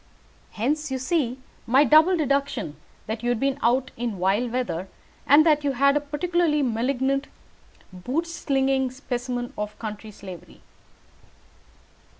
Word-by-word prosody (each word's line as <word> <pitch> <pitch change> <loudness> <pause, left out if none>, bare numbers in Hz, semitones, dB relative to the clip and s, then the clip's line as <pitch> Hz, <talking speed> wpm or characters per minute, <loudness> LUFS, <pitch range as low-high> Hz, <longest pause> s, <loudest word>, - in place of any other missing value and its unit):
Hence, 295 +8 -1
you 265 - -2
see, 260 -2 0 0.3
my 260 +5 +5
double 315 +6 +5
deduction 280 - -1 0.3
that 220 +1 -4
you 240 - -1
had 245 -2 +1
been 275 +1 0
out 255 +3 +2
in 230 -4 -3
vile 195 +7 +1
weather, 230 -7 -2 0.4
and 295 +3 +7
that 300 -2 +3
you 280 -1 0
had 280 +2 +3
a - - +4
particularly 300 +1 0
malignant 265 +3 0 0.7
boot 255 - -2
slicking 270 -5 0
specimen 245 -2 -4
of 210 0 -4
the - - -8
London 215 0 -6
slavey. 185 -4 -11
260 Hz, 140 wpm, -24 LUFS, 235-285 Hz, 0.7 s, and